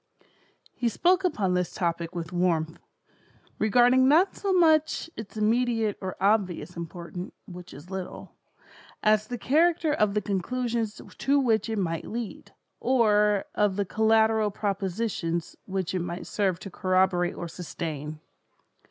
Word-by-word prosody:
He 245 Hz, -2 st, 0 dB
spoke 360 Hz, -, +2 dB
upon 205 Hz, -, +1 dB
this 180 Hz, -1 st, -1 dB
topic 170 Hz, -1 st, -2 dB
with 165 Hz, 0 st, -5 dB
warmth: 170 Hz, -2 st, 0 dB, 0.8 s
regarding 245 Hz, +4 st, +5 dB
not 335 Hz, +7 st, +4 dB
so 395 Hz, -, -2 dB
much 320 Hz, -2 st, +3 dB
its 220 Hz, -1 st, -8 dB
immediate 225 Hz, -1 st, +1 dB
or 190 Hz, -1 st, -4 dB
obvious 185 Hz, -5 st, +1 dB
importance 170 Hz, +2 st, -7 dB
(which 180 Hz, 0 st, -10 dB
is 145 Hz, +7 st, -12 dB
little), 190 Hz, -1 st, -6 dB, 0.7 s
as 215 Hz, 0 st, +3 dB
the 245 Hz, -, -4 dB
character 320 Hz, +4 st, +2 dB
of 215 Hz, -8 st, +1 dB
the 210 Hz, -, +2 dB
conclusions 225 Hz, +2 st, -2 dB, 0.2 s
to 280 Hz, +1 st, +3 dB
which 230 Hz, -4 st, +1 dB
it 220 Hz, -, -2 dB
might 165 Hz, -4 st, -2 dB
lead, 230 Hz, -1 st, -6 dB, 0.3 s
or 210 Hz, -5 st, +3 dB
of 205 Hz, -2 st, +1 dB
the 200 Hz, 0 st, 0 dB
collateral 220 Hz, +1 st, +3 dB
propositions 195 Hz, -4 st, -2 dB
which 190 Hz, -2 st, -2 dB
it 185 Hz, -, 0 dB
might 175 Hz, 0 st, -5 dB
serve 195 Hz, -4 st, 0 dB
to 195 Hz, -, -8 dB
corroborate 185 Hz, -1 st, +1 dB
or 175 Hz, -, -5 dB
sustain. 155 Hz, -3 st, -6 dB
205 Hz, 135 wpm, -27 LUFS, 180-235 Hz, 0.8 s, regarding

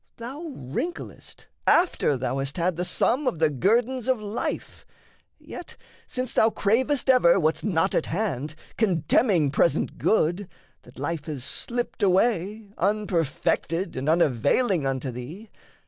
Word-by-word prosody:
Thou 280 Hz, +8 st, -7 dB
wrinklest 145 Hz, -, -6 dB, 0.2 s
after 340 Hz, -, +3 dB
thou 130 Hz, +1 st, -2 dB
hast 135 Hz, +4 st, -3 dB
had 175 Hz, 0 st, 0 dB
the 175 Hz, -, -2 dB
sum 255 Hz, +9 st, 0 dB
Of 175 Hz, -, 0 dB
the 155 Hz, -1 st, +2 dB
guerdons 235 Hz, -, +1 dB
of 260 Hz, -3 st, +2 dB
life; 210 Hz, +2 st, -4 dB, 0.5 s
yet, 355 Hz, -, -10 dB, 0.3 s
since 255 Hz, -1 st, -4 dB
thou 220 Hz, -, +4 dB
cravest 250 Hz, +7 st, +1 dB
ever 245 Hz, -9 st, +5 dB
What's 160 Hz, -1 st, 0 dB
not 175 Hz, -6 st, +1 dB
at -, -, 0 dB
hand, 155 Hz, -, -2 dB, 0.2 s
contemning 175 Hz, -, +2 dB
present 170 Hz, -, +1 dB
good, 185 Hz, -1 st, +1 dB, 0.3 s
That 125 Hz, -, -18 dB
life 145 Hz, +2 st, -3 dB
has 145 Hz, -6 st, -5 dB
slipped 240 Hz, -, -4 dB
away, 200 Hz, +1 st, +1 dB
unperfected 180 Hz, -2 st, 0 dB
And 135 Hz, +3 st, -2 dB
unavailing 160 Hz, -, +2 dB
unto 130 Hz, -1 st, -2 dB
thee. 155 Hz, -, -9 dB
180 Hz, 130 wpm, -25 LUFS, 150-230 Hz, 0.5 s, ever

